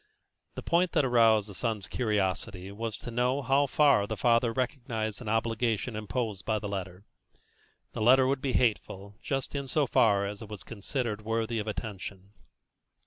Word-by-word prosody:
The - - -6
point 170 +1 +2
that 145 - +3
aroused 115 -4 +4
the 100 - -9
son's 110 -2 -2
curiosity 100 -3 -1
was 110 +2 -4
to 120 - -8
know 125 +4 0
how 140 +2 +3
far 135 -8 +4
the 110 - -4
father 115 +3 +3
recognised 115 -3 -3
an 115 - -5
obligation 115 +1 0
imposed 110 -1 -3
by 110 -1 0
the 105 - -4
letter. 95 -1 -6 0.9
The - - -5
letter 130 +4 +6
would 135 0 0
be 135 -2 -1
hateful 100 -4 0
just 135 -2 -3
in 140 -1 -3
so 145 +3 +2
far 100 -5 +3
as 100 +2 -6
it 110 - -8
was 105 -3 -7
considered 115 0 -4
worthy 115 +1 -1
of 105 - -4
attention. 100 -2 -6
115 Hz, 170 wpm, -29 LUFS, 105-125 Hz, 0.9 s, letter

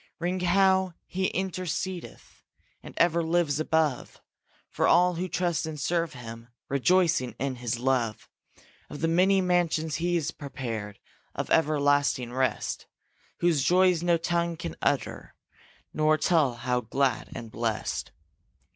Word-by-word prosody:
Ring 180 +2 -2
how 190 0 +3
he 190 +1 -1
intercedeth 185 -1 -4 0.4
And - - -11
ever 170 0 +3
lives 165 -3 +1
above 155 -4 0 0.5
For - - 0
all 180 +1 +5
who 180 +2 -3
trust 170 -2 -1
and 155 -2 -6
serve 170 +3 0
him, 115 -1 -9 0.2
Rejoicing 155 -2 +2
in 135 0 -3
his 120 -1 -2
love; 125 -3 -1 0.6
Of 145 - -8
the 165 - +2
many 185 +4 +3
mansions 170 -4 +1
he's 170 -2 0
prepared 115 -8 -6 0.4
Of - - -4
everlasting 145 -5 +2
rest, 130 -3 -1 0.5
Whose 170 -5 +3
joys 180 0 +4
no 175 -1 +3
tongue 170 0 -1
can 80 - -6
utter - - -2 0.6
Nor 155 0 +3
tell 155 -6 +2
how 125 +1 -1
glad 125 0 -1
and 115 -2 -7
blest. 115 -2 -3
160 Hz, 130 wpm, -27 LUFS, 130-175 Hz, 0.6 s, all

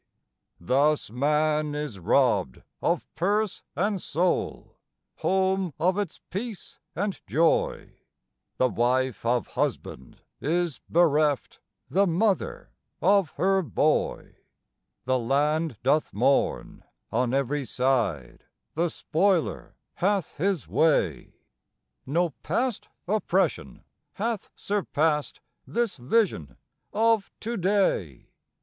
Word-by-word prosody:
Thus 140 - +1
man 150 +3 +1
is 150 -9 -4
robbed 65 -6 +2 0.2
of - - 0
purse 205 +4 0
and 200 0 0
soul, 175 +4 -1 0.4
home 190 -3 +1
of 185 +4 +2
its 200 -6 -4
peace 210 +2 -6 0.2
and 200 +1 -2
joy; 165 +1 +1 0.6
The 130 - +3
wife 125 +3 0
of 120 -3 +1
husband 65 -1 -4 0.2
is 170 -1 -1
bereft, 150 - +2 0.3
the 190 +10 +2
mother 190 +3 0 0.3
of 195 -1 +3
her 190 +4 +3
boy. 130 - 0 0.7
The 130 0 +2
land 145 +3 0
doth 150 +4 +2
mourn. 125 +7 +1 0.3
On 120 +1 +1
every 140 +2 0
side 120 - -1 0.3
the 170 +2 +1
spoiler 175 +2 0 0.2
hath 195 -3 0
his 185 -1 0
way; 140 - +1 0.7
No 170 +4 +1
past 250 -3 -1 0.2
oppression 195 -2 0 0.3
hath 225 0 -3
surpassed 160 -7 -1 0.3
this 235 -6 -1
vision 125 - 0 0.3
of 225 -1 +2
to 235 +2 -3
day. 185 - 0
160 Hz, 100 wpm, -26 LUFS, 130-195 Hz, 0.7 s, The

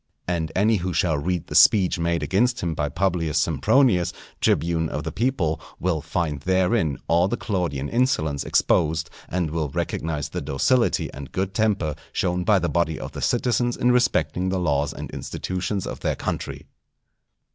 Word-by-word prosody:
And 85 -3 -1
any 110 +3 +3
who 90 0 -3
shall 85 -5 +1
read 90 +2 -2
the - - -8
speech 95 -4 +5
made 85 0 0
against 120 +6 +1
him 85 -4 -1
by 75 -1 -1
Publius 85 -2 0
Sempronius, 85 - +3 0.3
tribune 80 -1 +1
of 75 - -4
the 80 - -4
people, 100 - 0 0.2
will 85 -3 0
find 80 -2 -2
therein 95 - +1
all 85 +3 +3
the 120 +5 -2
Claudian 85 - -2
insolence 80 - 0
exposed, 80 +1 +1 0.2
and 85 -3 -1
will 80 -2 -1
recognize 75 +2 -3
the - - -4
docility 120 - +1
and 70 -1 -9
good 95 +1 -2
temper 105 -9 +1 0.2
shown 90 -1 0
by 105 +2 +4
the 85 -2 0
body 85 -3 0
of - - -6
the - - -7
citizens 120 0 +1
in 125 - +3
respecting 120 -7 +1
the 95 0 0
laws 75 -5 +1
and - - -7
institutions 95 +1 -3
of - - -6
their - - -1
country. - - -4
90 Hz, 170 wpm, -24 LUFS, 80-100 Hz, 0.3 s, speech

